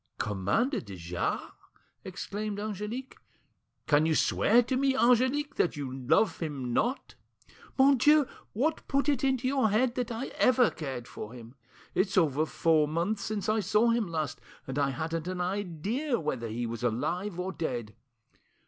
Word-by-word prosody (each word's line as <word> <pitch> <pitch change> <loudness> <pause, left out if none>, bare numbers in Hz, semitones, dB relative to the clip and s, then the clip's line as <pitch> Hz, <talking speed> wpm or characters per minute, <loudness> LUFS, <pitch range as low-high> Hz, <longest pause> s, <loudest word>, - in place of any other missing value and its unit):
"Commander 105 - 0
de 100 -4 -9
Jars!" 85 0 -3 0.5
exclaimed 205 +2 -5
Angelique. 215 +5 -5 0.7
"Can 150 +1 +3
you 160 - +2
swear 240 +9 +4
to 260 +2 -1
me, 270 0 +2
Angelique, 260 +5 +2
that 175 - +1
you 135 -3 -4
love 135 - +2
him 140 -7 -3
not?" 250 - -1 0.6
"Mon 275 0 +6
Dieu! 300 +3 +6 0.3
What 305 +9 -1
put 275 +1 +1
it 280 -3 +1
into 260 -2 +1
your 260 -4 +2
head 235 +4 +2
that 245 -1 -3
I 235 +3 -4
ever 250 -2 +5
cared 130 -6 -6
for 110 - -8
him? 120 -1 -11 0.4
It's 195 +1 +1
over 155 -3 +3
four 155 -2 +2
months 175 +7 -1
since 215 -2 -3
I 215 +1 +2
saw 215 +3 +3
him 230 -3 +1
last, 160 -3 -3 0.2
and 135 +2 -3
I 140 -1 +2
hadn't 165 +3 -3
an 185 0 -3
idea 205 - -2
whether 130 -7 -3
he 115 +2 -3
was 115 0 -5
alive 175 - -1
or 185 +1 -2
dead. 120 - -4
190 Hz, 160 wpm, -29 LUFS, 145-245 Hz, 0.7 s, Mon